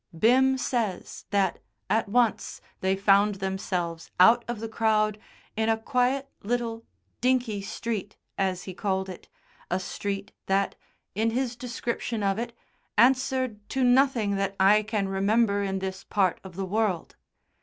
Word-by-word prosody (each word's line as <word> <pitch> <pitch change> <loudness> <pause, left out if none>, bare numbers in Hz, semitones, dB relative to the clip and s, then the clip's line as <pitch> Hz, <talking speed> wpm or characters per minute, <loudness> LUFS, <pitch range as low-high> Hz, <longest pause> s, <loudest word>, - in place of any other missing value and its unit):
Bim 260 +6 +4
says 230 -7 -2
that, 200 -1 +1 0.3
at 220 -1 +1
once, 235 0 +1 0.2
they 190 +1 +1
found 200 +1 +4
themselves 180 -4 -3
out 230 +6 +7
of 240 -2 -3
the 225 - -4
crowd 215 -1 +1 0.4
in 220 0 +1
a 225 - +3
quiet, 250 +4 0
little 230 +1 -2 0.3
"dinky" 245 -5 +1
street, 210 0 -4 0.2
as 185 -2 -1
he 185 - -7
called 190 0 -1
it, 180 - -10 0.4
a 180 - 0
street 200 +1 -4 0.2
that, 195 +1 +1 0.4
in 220 +3 +1
his 245 +1 -1
description 235 -2 -3
of 195 +1 +1
it, 235 0 -3 0.5
answered 255 -1 +3
to 265 - 0
nothing 245 -5 +3
that 195 0 -1
I 200 +3 +6
can 210 -2 -1
remember 200 +2 +2
in 195 -1 -1
this 190 0 -4
part 190 -4 +1
of 190 -3 -11
the 195 +1 -3
world. 200 -3 -1
210 Hz, 145 wpm, -27 LUFS, 195-235 Hz, 0.5 s, out